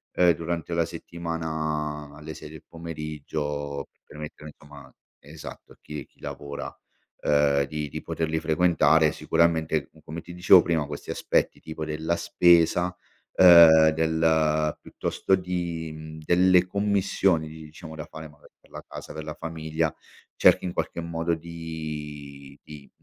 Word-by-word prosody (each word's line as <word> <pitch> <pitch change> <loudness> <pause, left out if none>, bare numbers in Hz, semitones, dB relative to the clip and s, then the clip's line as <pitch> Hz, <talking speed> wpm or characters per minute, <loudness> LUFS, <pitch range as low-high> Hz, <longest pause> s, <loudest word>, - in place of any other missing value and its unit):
uhm, 90 -1 +5
durante 85 +1 -3
la 85 0 +2
settimana 80 -3 -4
alle 80 +1 -8
6 75 - -10
del 80 -1 -12
pomeriggio, 75 -3 -5
per - - -46
permettere 75 0 -9
insomma 75 -1 -14 0.3
esatto 75 +2 -11
a - - -24
chi 75 -1 -8
chi - - -34
lavora, 70 0 -6 0.6
uhm 70 -1 +3
di 75 0 -4
di - - -6
poterli 80 0 -2
frequentare 80 -1 +3
sicuramente 80 -3 +1
come 80 +2 -7
ti 85 - -11
dicevo 90 +1 +7
prima 80 -4 0
questi 75 0 -6
aspetti - - 0
tipo 80 0 -6
della 80 +2 -1
spesa, 85 +1 +3 0.4
ehm 85 -3 +9
del 80 -1 +1
piuttosto 95 - -1
di 85 -3 -4
mhmm, 80 0 -9
delle 90 0 +5
commissioni 95 -4 +1
diciamo 80 +1 -11
da 75 - -7
fare 80 0 -9
magari 75 -1 -20
per - - -27
la - - -9
casa, - - -9
per 80 - -6
la 75 0 -6
famiglia, 80 -1 -3 0.4
cerchi - - +5
in 90 - -3
qualche - - -3
modo 85 0 -1
di 75 -4 -8
di 75 -2 -12
80 Hz, 140 wpm, -26 LUFS, 75-85 Hz, 0.6 s, ehm